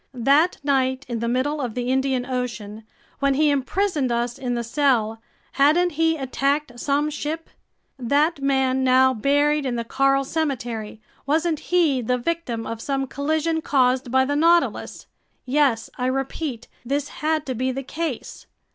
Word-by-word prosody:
That 280 Hz, +8 st, +3 dB
night 265 Hz, -1 st, +1 dB
in 235 Hz, -2 st, -3 dB
the 235 Hz, -, -2 dB
middle 275 Hz, +5 st, 0 dB
of 240 Hz, -4 st, -4 dB
the 245 Hz, 0 st, -2 dB
Indian 265 Hz, -1 st, 0 dB
Ocean, 225 Hz, -4 st, -5 dB, 0.3 s
when 275 Hz, -1 st, +2 dB
he 300 Hz, +1 st, +3 dB
imprisoned 285 Hz, 0 st, 0 dB
us 235 Hz, 0 st, -1 dB
in 245 Hz, -2 st, -2 dB
the 235 Hz, -, -2 dB
cell, 230 Hz, -3 st, +1 dB, 0.3 s
hadn't 315 Hz, +6 st, +3 dB
he 325 Hz, +1 st, +1 dB
attacked 275 Hz, -1 st, -1 dB
some 290 Hz, +3 st, 0 dB
ship? 305 Hz, +2 st, -5 dB, 0.5 s
That 285 Hz, +5 st, +1 dB
man 265 Hz, -1 st, +1 dB
now 260 Hz, 0 st, +5 dB
buried 290 Hz, +5 st, +2 dB
in 255 Hz, -3 st, -2 dB
the 235 Hz, -, -2 dB
coral 275 Hz, +3 st, +2 dB
cemetery, 240 Hz, -8 st, -3 dB, 0.3 s
wasn't 315 Hz, +1 st, +1 dB
he 325 Hz, -8 st, +3 dB
the 250 Hz, +2 st, 0 dB
victim 250 Hz, -5 st, -3 dB
of 230 Hz, 0 st, -5 dB
some 270 Hz, 0 st, -1 dB
collision 315 Hz, +4 st, -1 dB
caused 255 Hz, -3 st, +2 dB
by 260 Hz, +1 st, +3 dB
the 285 Hz, +2 st, -1 dB
Nautilus? 335 Hz, +3 st, +2 dB, 0.4 s
Yes, 260 Hz, -4 st, +2 dB
I 250 Hz, -, 0 dB
repeat: 270 Hz, -1 st, -3 dB, 0.2 s
this 280 Hz, +3 st, -1 dB
had 310 Hz, 0 st, 0 dB
to 260 Hz, -, -3 dB
be 255 Hz, +2 st, -1 dB
the 270 Hz, +1 st, -4 dB
case. 305 Hz, -1 st, -5 dB
270 Hz, 155 wpm, -23 LUFS, 250-295 Hz, 0.5 s, now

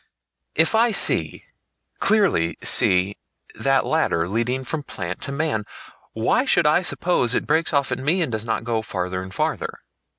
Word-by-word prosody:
If 160 Hz, +5 st, +3 dB
I 230 Hz, +2 st, +4 dB
see, 215 Hz, -, +1 dB, 0.5 s
clearly 190 Hz, -, +2 dB
see, 95 Hz, +2 st, +3 dB, 0.4 s
that -, -, +1 dB
ladder 85 Hz, 0 st, 0 dB
leading 120 Hz, +6 st, -1 dB
from 150 Hz, +4 st, -4 dB
plant 90 Hz, -9 st, -6 dB
to -, -, -3 dB
man, 140 Hz, -7 st, -1 dB, 0.5 s
why 115 Hz, -, +1 dB
should 260 Hz, -, +2 dB
I 155 Hz, +4 st, +4 dB
suppose 170 Hz, -9 st, 0 dB
it -, -, -1 dB
breaks 160 Hz, +2 st, +1 dB
off 140 Hz, -3 st, 0 dB
at 130 Hz, -, -2 dB
me 165 Hz, +7 st, +1 dB
and 145 Hz, -, -4 dB
does 110 Hz, -1 st, -2 dB
not 115 Hz, -1 st, -2 dB
go 115 Hz, -1 st, -1 dB
farther 90 Hz, -3 st, -4 dB
and 95 Hz, 0 st, -9 dB
farther? -, -, -2 dB
125 Hz, 165 wpm, -22 LUFS, 100-160 Hz, 0.5 s, I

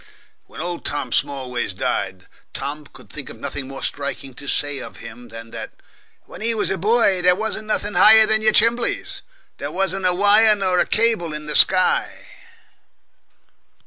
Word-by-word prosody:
When -, -, -12 dB
old 175 Hz, -1 st, -4 dB, 0.3 s
Smallways 125 Hz, -7 st, -2 dB
died, 95 Hz, 0 st, -3 dB, 0.3 s
Tom 145 Hz, +2 st, -5 dB
could 125 Hz, -4 st, -16 dB
think 145 Hz, -3 st, -7 dB
of -, -, -10 dB
nothing 140 Hz, -1 st, -6 dB
more 135 Hz, 0 st, -9 dB
striking 140 Hz, -1 st, -5 dB
to 140 Hz, +3 st, -12 dB
say 145 Hz, 0 st, -2 dB
of -, -, -10 dB
him 115 Hz, +1 st, -11 dB
than 115 Hz, 0 st, -11 dB
that, -, -, -8 dB, 0.5 s
"When -, -, -13 dB
he 230 Hz, +1 st, -1 dB
was 210 Hz, -, -1 dB
a 190 Hz, -, -1 dB
boy, 205 Hz, -2 st, +2 dB
there 180 Hz, 0 st, +4 dB
wasn't 220 Hz, +1 st, -3 dB
nothing 210 Hz, -1 st, -1 dB
higher 220 Hz, +4 st, +7 dB
than 220 Hz, 0 st, +2 dB
your 220 Hz, 0 st, +4 dB
chimbleys 230 Hz, +2 st, +1 dB, 0.4 s
there -, -, -4 dB
wasn't 195 Hz, 0 st, 0 dB
a 180 Hz, -, +3 dB
wire 210 Hz, +3 st, +5 dB
nor 185 Hz, -3 st, 0 dB
a -, -, +1 dB
cable 215 Hz, -8 st, +1 dB
in 150 Hz, 0 st, -7 dB
the 150 Hz, -, -4 dB
sky!" 185 Hz, -1 st, +3 dB
180 Hz, 170 wpm, -20 LUFS, 140-215 Hz, 0.5 s, higher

